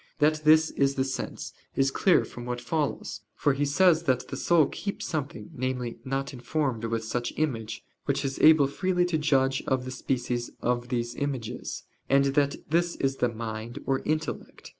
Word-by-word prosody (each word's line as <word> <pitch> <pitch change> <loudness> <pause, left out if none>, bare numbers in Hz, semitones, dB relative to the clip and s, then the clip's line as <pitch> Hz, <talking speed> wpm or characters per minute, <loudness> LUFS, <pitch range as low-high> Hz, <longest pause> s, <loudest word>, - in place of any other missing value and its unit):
That 155 0 +2
this 155 +1 +6
is 140 0 +1
the 130 - +2
sense, 130 0 -4 0.2
is 135 0 +2
clear 185 +6 +4
from 120 - -9
what 120 0 -3
follows. 150 +4 -2
For 145 - +2
he 145 +2 0
says 170 +3 +4
that 130 -4 +1
the - - -4
soul 170 -3 +4
"keeps 200 - -5
something" 155 +1 -4
namely, 125 -3 -3
not 135 +1 -2
informed 125 -2 -2
with 115 0 -1
such 120 +2 -2
image 120 -8 -2 0.2
"which 140 0 0
is 135 0 -3
able 155 -2 +7
freely 180 +5 +1
to 170 -3 0
judge 135 -3 +2
of 130 -1 +1
the 130 - -5
species 125 -2 -2
of 120 0 0
these 120 -1 -1
images": 125 -4 -4 0.3
and 140 0 +5
that 140 0 +2 0.2
this 170 +1 +2
is 135 0 -1
the 125 - +2
"mind" 110 0 -5
or 135 -1 +1
"intellect." 155 0 -3
135 Hz, 180 wpm, -27 LUFS, 125-155 Hz, 0.3 s, able